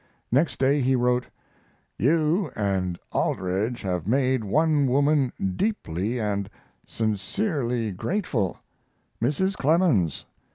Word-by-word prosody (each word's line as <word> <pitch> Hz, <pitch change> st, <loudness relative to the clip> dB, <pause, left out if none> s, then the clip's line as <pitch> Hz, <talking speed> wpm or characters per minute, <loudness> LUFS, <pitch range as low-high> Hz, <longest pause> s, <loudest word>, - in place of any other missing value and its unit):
Next 145 Hz, +7 st, +2 dB
day 140 Hz, +2 st, +2 dB
he 130 Hz, +1 st, +2 dB
wrote: 125 Hz, 0 st, +1 dB, 0.7 s
You 160 Hz, -, +2 dB
and 95 Hz, -4 st, -1 dB
Aldrich 100 Hz, +7 st, -1 dB
have 90 Hz, -3 st, -2 dB
made 130 Hz, 0 st, +2 dB
one 150 Hz, +6 st, +2 dB
woman 140 Hz, 0 st, +2 dB, 0.2 s
deeply 120 Hz, -, -1 dB
and 100 Hz, -2 st, -1 dB, 0.4 s
sincerely 115 Hz, -, -1 dB
grateful 115 Hz, -, -2 dB, 0.6 s
Mrs. 190 Hz, +11 st, +1 dB
Clemens. 140 Hz, -, +2 dB
125 Hz, 95 wpm, -25 LUFS, 100-150 Hz, 0.7 s, Next